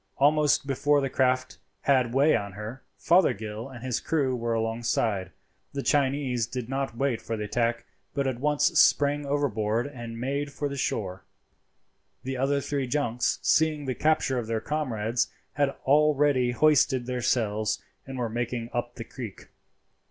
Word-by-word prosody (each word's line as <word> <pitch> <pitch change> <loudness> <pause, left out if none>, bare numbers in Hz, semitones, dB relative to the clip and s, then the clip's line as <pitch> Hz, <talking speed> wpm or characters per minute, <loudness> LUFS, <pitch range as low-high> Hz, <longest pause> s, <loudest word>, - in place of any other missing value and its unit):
Almost 150 +1 +3
before 145 +2 +2
the 135 -2 -2
craft 130 -7 +1 0.2
had 130 -4 +2
way 140 +5 +4
on 100 -1 -3
her, 105 +6 -7 0.2
Fothergill 110 - +1
and 125 -3 -10
his 125 -2 -1
crew 140 -5 0
were 115 -1 -1
alongside. 115 -4 -1 0.4
The 140 -1 -3
Chinese 135 -4 +1
did 125 -1 -5
not 135 -2 -3
wait 135 -4 0
for 115 - -4
the 105 - -3
attack, 115 +2 -1 0.3
but 140 - 0
at 130 -3 -2
once 150 +1 +1 0.2
sprang 145 0 +4
overboard 120 -5 0
and 120 -5 -7
made 140 +3 -2
for 145 +1 -3
the 140 - -5
shore. 95 -8 -2 1.0
The 130 +1 -3
other 140 +2 +1
three 140 -2 -2
junks, 125 -3 0
seeing 155 -2 +2
the 130 - -1
capture 150 -3 +1
of 115 - -5
their 115 -1 -1
comrades, 120 -5 -1 0.3
had 145 -1 +2 0.2
already 145 -3 +4
hoisted 130 -1 +3
their 125 0 -3
sails, 110 -3 0 0.3
and 135 -1 -6
were 120 -2 -1
making 120 +1 -3
up 120 0 -3
the 115 - -6
creek. 115 -3 -9
130 Hz, 160 wpm, -27 LUFS, 115-140 Hz, 1.0 s, way